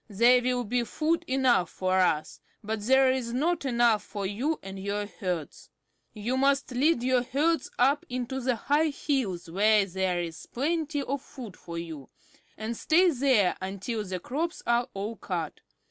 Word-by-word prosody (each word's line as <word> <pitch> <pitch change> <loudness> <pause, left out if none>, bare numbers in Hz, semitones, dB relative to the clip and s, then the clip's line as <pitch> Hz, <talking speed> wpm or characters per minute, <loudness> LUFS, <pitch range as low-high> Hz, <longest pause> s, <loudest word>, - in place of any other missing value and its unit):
"There 240 +5 +5
will 250 0 0
be 240 +2 0
food 315 +7 0
enough 255 -8 +2
for 185 0 0
us, 160 -4 +1 0.2
but 215 0 -3
there 265 +4 +4
is 245 -3 -2
not 315 +4 0
enough 235 -4 +3
for 200 -2 -5
you 255 +11 -1
and 195 0 -7
your 205 +1 -2
herds. 180 -5 -5 0.4
You 235 +4 -2
must 275 0 +2
lead 260 +1 +2
your 255 -1 +3
herds 290 +5 0
up 275 +4 +3
into 255 +1 -3
the 250 0 +1
high 295 +7 +1
hills 255 - -2
where 205 +4 +3
there 190 -1 -1
is 165 -2 -6
plenty 300 +1 -1
of 280 0 -3
food 240 -9 -10
for 170 0 -8
you, 160 -5 -7 0.5
and 220 +2 -4
stay 345 +8 +4
there 250 - +3
until 200 +4 -3
the 185 -2 -4
crops 320 - -3
are 240 +1 +1
all 210 +3 -4
cut. 170 -5 -4
240 Hz, 165 wpm, -28 LUFS, 195-270 Hz, 0.5 s, There